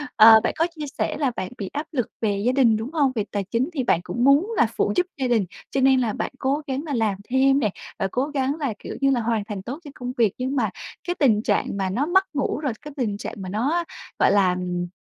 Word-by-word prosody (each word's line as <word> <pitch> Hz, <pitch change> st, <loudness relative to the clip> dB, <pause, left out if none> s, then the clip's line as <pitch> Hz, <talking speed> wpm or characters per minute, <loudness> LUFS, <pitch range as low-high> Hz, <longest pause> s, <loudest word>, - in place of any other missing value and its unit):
ờ, 220 Hz, 0 st, +9 dB
bạn -, -, 0 dB
có 330 Hz, +2 st, +2 dB
chia 300 Hz, -1 st, -5 dB
sẻ -, -, -1 dB
là 280 Hz, -4 st, +1 dB
bạn 185 Hz, -, -4 dB
bị 195 Hz, -3 st, -5 dB
áp 295 Hz, +2 st, -3 dB
lực 250 Hz, -7 st, -1 dB
về 205 Hz, -2 st, 0 dB
gia 250 Hz, -, +4 dB
đình, 240 Hz, -5 st, +4 dB
đúng 240 Hz, +8 st, -6 dB
hông? 285 Hz, -5 st, +2 dB
Về 215 Hz, -, 0 dB
tài 200 Hz, -1 st, -1 dB
chính 235 Hz, -, -1 dB
thì 265 Hz, -5 st, -1 dB
bạn 170 Hz, -, +2 dB
cũng 240 Hz, +7 st, -2 dB
muốn 295 Hz, -, +4 dB
là -, -, +5 dB
phụ -, -, +1 dB
giúp 360 Hz, 0 st, +3 dB
gia 260 Hz, -2 st, 0 dB
đình, 225 Hz, -5 st, +2 dB, 0.3 s
cho 270 Hz, -, 0 dB
nên 265 Hz, 0 st, +5 dB
là 230 Hz, -4 st, 0 dB
bạn -, -, -3 dB
cố 280 Hz, +3 st, 0 dB
gắng 270 Hz, +2 st, -2 dB
là 295 Hz, -4 st, -4 dB
làm 220 Hz, -5 st, +1 dB
thêm 270 Hz, +2 st, +4 dB
nè, 215 Hz, -6 st, +1 dB, 0.3 s
và 195 Hz, -, +1 dB
cố 260 Hz, +3 st, 0 dB
gắng 280 Hz, -1 st, -1 dB
là, 270 Hz, -7 st, -1 dB
kiểu -, -, -7 dB
như 275 Hz, -, +4 dB
là, 245 Hz, -3 st, +1 dB
hoàn 220 Hz, -2 st, 0 dB
thành 205 Hz, -4 st, -5 dB
tốt 255 Hz, -, -6 dB
cho 290 Hz, -, -10 dB
công 250 Hz, 0 st, -5 dB
việc. 220 Hz, -5 st, +3 dB
Nhưng 260 Hz, +2 st, -2 dB
mà 220 Hz, -6 st, +1 dB, 0.4 s
cái 355 Hz, -, 0 dB
tình 220 Hz, -7 st, +4 dB
trạng -, -, 0 dB
mà 190 Hz, -1 st, -1 dB
nó 250 Hz, +10 st, 0 dB
mất 380 Hz, +3 st, +4 dB
ngủ, 280 Hz, +1 st, -1 dB
rồi 275 Hz, -7 st, -2 dB
cái 295 Hz, -1 st, -9 dB
tình 210 Hz, -6 st, -1 dB
trạng -, -, -6 dB
mà 190 Hz, -2 st, -6 dB
nó, 280 Hz, -, 0 dB, 0.4 s
gọi -, -, +5 dB
là, 200 Hz, -2 st, +4 dB
ừm, 180 Hz, -1 st, -3 dB
250 Hz, 270 wpm, -23 LUFS, 215-280 Hz, 0.4 s, ờ